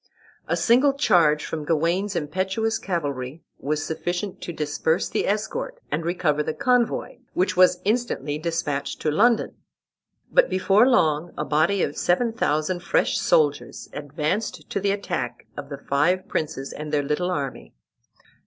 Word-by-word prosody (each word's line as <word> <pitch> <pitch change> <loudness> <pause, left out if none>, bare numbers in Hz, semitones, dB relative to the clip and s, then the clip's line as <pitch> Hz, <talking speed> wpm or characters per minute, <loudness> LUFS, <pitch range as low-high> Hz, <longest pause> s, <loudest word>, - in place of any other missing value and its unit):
A - - 0
single 260 +4 +4
charge 170 - +3
from 155 -2 -4
Gawain's 170 +6 0
impetuous 190 +8 -1
cavalry 145 -6 -3 0.2
was 150 +2 -2
sufficient 175 +4 -3
to - - -5
disperse 155 +1 0
the - - -1
escort 485 - -2
and 165 - -1
recover 160 -3 0
the 155 +1 -3
convoy, 250 -2 +1 0.2
which 185 +1 +1
was 180 -1 +5
instantly 205 - -1
despatched 155 -4 -2
to 155 - +2
London. 230 +8 +2 0.7
But - - +4
before 195 +5 +4
long 160 - +2
a - - -2
body 165 +6 +2
of 145 - -2
seven 225 +6 +1
thousand 155 -4 0
fresh 175 - +1
soldiers 145 -2 +1
advanced 150 +8 -3
to - - 0
the 200 +1 0
attack 200 0 -3
of 140 -1 -7
the 140 - -5
five 160 +7 +1
princes 150 -3 -3
and 150 0 -6
their 145 -1 +1
little 150 +6 -1
army. 135 - -4
170 Hz, 145 wpm, -24 LUFS, 150-200 Hz, 0.7 s, was